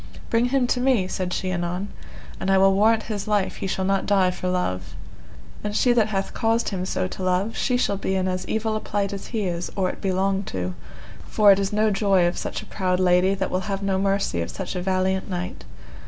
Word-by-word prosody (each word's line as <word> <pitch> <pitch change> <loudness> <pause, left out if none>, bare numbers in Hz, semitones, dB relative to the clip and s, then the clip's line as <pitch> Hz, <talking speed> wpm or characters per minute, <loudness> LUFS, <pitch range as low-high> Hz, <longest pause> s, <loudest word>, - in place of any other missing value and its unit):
Bring 230 +1 +3
me 270 -2 +3
to 250 0 0
him, 240 -9 +2
said 185 -1 -3
she 185 +1 -2
anon, 180 +3 -2 0.5
and 190 - -2
I 195 - +5
will 195 0 +5
warrant 220 +3 +3
his 210 -2 -4
life 205 -2 0
he - - -3
shall 190 0 -1
not 195 0 0
die 190 -3 +3
for 185 - -5
love, 90 - -2 0.7
and 210 0 -3
she 245 +2 +4
that 225 -3 +3
hath 195 -2 -2
caused 225 0 +1
him 185 -2 -3
so 185 - -1
to - - -7
love, 185 +4 0
she 250 -2 +1
shall 200 -5 0
be 190 0 -1
in 190 0 0
as 185 0 -2
evil 220 0 -1
plight 200 -2 -2
as 200 - -6
he 225 -3 -2
is 175 -2 -2
or 185 -2 +1
it - - -13
be 195 - 0
long 195 +1 +1
to, 90 - -3 0.5
for 210 -2 +5
it 195 - +4
is 195 -1 -1
no 215 +1 +2
joy 195 -3 +3
of 175 - 0
such - - -4
a - - -12
proud 185 -2 -1
lady 185 +1 +3
that 190 -1 -2
will 185 - +1
have 195 0 -2
no 195 -1 +1
mercy 195 - 0
of 85 - -4
such - - -5
a 180 - -2
valiant 190 +1 0
knight. 180 -1 -5
195 Hz, 235 wpm, -24 LUFS, 185-210 Hz, 0.7 s, I